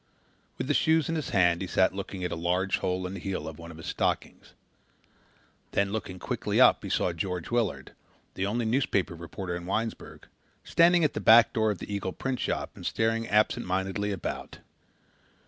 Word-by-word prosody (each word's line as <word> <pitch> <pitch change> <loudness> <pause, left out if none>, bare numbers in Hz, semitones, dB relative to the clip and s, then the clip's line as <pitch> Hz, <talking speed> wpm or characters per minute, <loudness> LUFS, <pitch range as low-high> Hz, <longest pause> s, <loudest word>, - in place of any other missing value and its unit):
With - - -3
the 145 - +1
shoes 160 +1 +3
in 165 - 0
his 155 - -3
hand 90 -3 +3
he 95 - -3
sat 95 0 +2
looking 95 -1 -6
at 90 - -2
a - - -2
large 90 +3 0
hole 90 0 -1
in 90 - -5
the 100 - -6
heel 90 -4 -4
of 80 0 -8
one 85 0 -9
of 80 - -10
his 80 - -10
stockings. - - -2 1.2
Then 100 0 +1
looking 95 -3 -4
quickly - - -2
up - - +6
he - - -5
saw 90 - +1
George 90 +2 -4
Willard, 110 - -1 0.4
the 95 +1 -2
only 115 +3 -1
newspaper 110 -6 +1
reporter 85 +2 -6
in 85 0 -7
Winesburg, 110 +4 -4 0.4
standing 170 0 +4
at 150 - +2
the - - -3
back 115 0 +7
door 110 -1 +2
of 105 - -1
the 100 - -7
Eagle 100 -2 -3
printshop 130 -2 -2
and - - -12
staring 115 0 0
absentmindedly 100 -1 +1
about. 95 -4 -5
95 Hz, 185 wpm, -28 LUFS, 90-115 Hz, 1.2 s, back